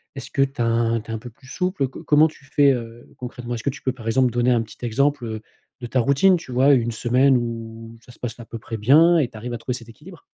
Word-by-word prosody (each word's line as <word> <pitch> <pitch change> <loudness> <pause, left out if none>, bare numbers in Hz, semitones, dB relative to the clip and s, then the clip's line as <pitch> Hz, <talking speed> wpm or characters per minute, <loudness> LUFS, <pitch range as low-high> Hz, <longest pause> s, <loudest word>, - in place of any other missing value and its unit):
est-ce - - -8
que - - 0
tu 135 -1 -1
as 115 - +2
un, 115 0 +1
tu 115 - -10
es - - -3
un 110 - -4
peu 120 +2 -10
plus 115 +3 -22
souple? 180 -1 -1
Co 130 - -11
comment 150 +1 +5
tu 150 - -14
fais, 140 +1 +4
heu, 120 -2 -6
concrètement? 125 -1 -6
Est-ce 115 - -4
que - - +1
tu 145 +4 -8
peux, 130 - 0
par 120 -3 -10
exemple, 125 +2 +2
donner 120 +1 +1
un 120 -2 +2
petit 110 - -15
exemple, 140 +4 0
heu, 110 -1 -5 0.4
de - - -5
ta 125 +2 0
routine 140 +10 +4
tu 145 - -11
vois? 130 +3 +4
Une 120 -3 +1
semaine 125 +4 +3
où 115 -1 -6
ça 125 - -15
se - - -17
passe 120 -1 -6
à 120 - -9
peu 115 - -8
près 115 0 -7
bien 160 +10 +5
et 140 - +1
tu 110 - -12
arrives 120 +2 -6
à 115 - -5
trouver 125 +1 -3
cet 115 -2 -13
équilibre? 160 +10 -14
120 Hz, 290 wpm, -22 LUFS, 115-140 Hz, 0.4 s, comment